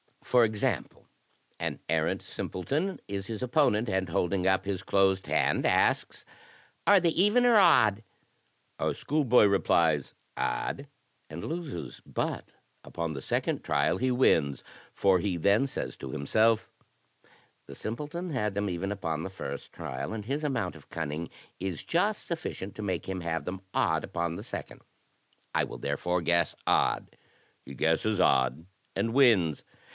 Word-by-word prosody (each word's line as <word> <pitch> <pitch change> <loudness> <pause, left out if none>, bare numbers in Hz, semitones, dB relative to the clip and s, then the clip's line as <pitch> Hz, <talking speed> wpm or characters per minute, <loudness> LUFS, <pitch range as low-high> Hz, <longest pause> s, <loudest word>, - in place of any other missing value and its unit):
For 125 -2 +4
example, 105 -2 -2 0.5
an - - -3
arrant - - +1
simple 90 - -5
ton 170 - -1
is 100 -1 -4
his 115 +1 -4
opponent, 120 -4 +2
and, 95 -2 0
holding 90 +2 0
up 95 0 +2
his 95 -2 -2
closed 95 0 +2
hand, - - +2
asks, - - +1 0.3
* - - -31
are 200 -1 +7
they 170 - +3
even 210 +9 +3
or 240 -2 +6
odd?* 110 - +5 0.8
Our - - 0
schoolboy 135 -6 +3
replies, 85 -7 +2 0.2
'odd,' 140 - -2 0.4
and 80 +2 -7
loses; 160 - -5
but - - -3 0.3
upon 85 -2 -4
the 70 - -6
second - - -1
trial - - +1
he 130 - +1
wins, 80 - +2 0.3
for 95 -2 +3
he 90 0 -1
then 100 +10 +3
says - - -5
to 65 - -7
himself, 110 - +2 1.0
'the - - -9
simpleton 150 +10 -5
had 105 -9 -1
them 100 0 0
even 90 +3 -3
upon 80 -6 -2
the 95 - -4
first 70 -7 -7
trial, 65 +11 -5
and 105 -2 -5
his 140 +6 -2
amount 115 - -1
of 75 - -19
cunning 80 0 -4 0.3
is 95 -3 -4
just 205 +5 0
sufficient 160 - -5
to - - -6
make 95 -4 -2
him 95 -1 -3
have 80 -2 -2
them 95 +1 -5
odd - - +1
upon 85 -1 -2
the - - -7
second; - - -7 0.7
I - - +2
will - - -8
therefore 90 0 -1
guess 85 0 +1
odd;' - - +1 0.2
— - - -36
^he 70 - -8
guesses 80 - +1
odd, 65 -1 +3 0.3
and 115 0 0
wins. 110 - +4
100 Hz, 155 wpm, -29 LUFS, 85-125 Hz, 1.0 s, are